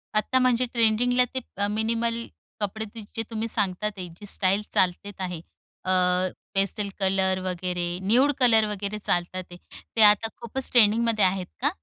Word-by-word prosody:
आता 215 Hz, +5 st, +2 dB
म्हणजे 255 Hz, -1 st, +2 dB
ट्रेंडिंगला 240 Hz, +2 st, +3 dB
ते 260 Hz, -, -1 dB, 0.2 s
अ, 205 Hz, 0 st, +1 dB
मिनिमल 230 Hz, +2 st, -1 dB, 0.4 s
कपडे 220 Hz, +2 st, -3 dB
ते 225 Hz, -, -6 dB
जे 225 Hz, -, -1 dB
तुम्ही 225 Hz, 0 st, -3 dB
सांगत 205 Hz, -3 st, 0 dB
आहे, 185 Hz, -1 st, -6 dB
जी 170 Hz, +5 st, -13 dB
स्टाईल 195 Hz, 0 st, +1 dB
चालतेत 190 Hz, +2 st, 0 dB
आहे, 180 Hz, -3 st, -4 dB, 0.5 s
अ, 185 Hz, -, 0 dB, 0.6 s
पेस्टल 200 Hz, +1 st, 0 dB
कलर 190 Hz, -1 st, +2 dB
वगैरे, 180 Hz, -1 st, -2 dB, 0.2 s
न्यूड 250 Hz, +9 st, +4 dB
कलर 225 Hz, -4 st, +5 dB
वगैरे 205 Hz, 0 st, -3 dB
चालतात 180 Hz, -1 st, -1 dB
आहे. 175 Hz, -, -10 dB, 0.4 s
ते 225 Hz, -, +3 dB
आता 210 Hz, +2 st, -1 dB
खूपच 255 Hz, +3 st, -3 dB
ट्रेनिंगमध्ये 225 Hz, -2 st, +4 dB
आहेत 185 Hz, 0 st, 0 dB, 0.2 s
का? 290 Hz, -, +3 dB
210 Hz, 155 wpm, -25 LUFS, 190-230 Hz, 0.6 s, कलर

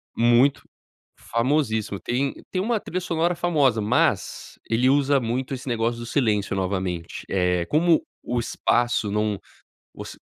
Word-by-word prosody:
Muito. 120 Hz, +4 st, +3 dB, 0.6 s
Famosíssimo. 115 Hz, -5 st, 0 dB
Tem 135 Hz, +3 st, -1 dB, 0.2 s
tem 185 Hz, -, -1 dB
uma 225 Hz, +2 st, 0 dB
trilha 185 Hz, -2 st, -4 dB
sonora 170 Hz, 0 st, 0 dB
famosa, 145 Hz, -10 st, +2 dB
mas, 105 Hz, -, 0 dB
ele 120 Hz, +3 st, +3 dB
usa 140 Hz, 0 st, +3 dB
muito 125 Hz, +3 st, -2 dB
esse 130 Hz, +1 st, -7 dB
negócio 115 Hz, -1 st, -1 dB
do 120 Hz, -, -6 dB
silêncio, 110 Hz, -6 st, 0 dB
novamente. 95 Hz, -3 st, -3 dB
Eh, 90 Hz, -2 st, +1 dB
como 165 Hz, +2 st, +3 dB, 0.2 s
o 120 Hz, 0 st, -1 dB
espaço 120 Hz, -2 st, 0 dB
não 105 Hz, -1 st, 0 dB, 0.6 s
voc -, -, -8 dB
120 Hz, 135 wpm, -24 LUFS, 105-145 Hz, 0.6 s, Muito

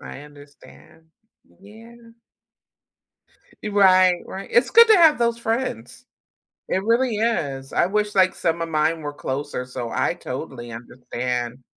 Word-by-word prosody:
I -, -, -10 dB
understand. 145 Hz, +2 st, -17 dB, 0.6 s
Yeah. 220 Hz, +4 st, -15 dB, 1.7 s
Right, 185 Hz, -3 st, +4 dB
right. 195 Hz, +1 st, -8 dB
It's 245 Hz, +2 st, +3 dB
good 465 Hz, +2 st, +8 dB
to 440 Hz, -2 st, +6 dB
have 320 Hz, -5 st, +5 dB
those 235 Hz, -1 st, +1 dB
friends, 225 Hz, -, -4 dB, 0.6 s
it 190 Hz, -, -1 dB
really 235 Hz, 0 st, +1 dB
is. 145 Hz, -12 st, -2 dB
I -, -, +2 dB
wish, 210 Hz, +2 st, -1 dB
like, 185 Hz, -1 st, +3 dB
some 170 Hz, 0 st, -2 dB
of 165 Hz, -, -4 dB
mine 160 Hz, +1 st, 0 dB
were 145 Hz, -1 st, -5 dB
closer, 145 Hz, -1 st, -5 dB
so 125 Hz, -2 st, -6 dB
I -, -, -1 dB
totally 120 Hz, 0 st, -7 dB
understand. 125 Hz, +1 st, -5 dB
175 Hz, 130 wpm, -22 LUFS, 135-225 Hz, 1.7 s, good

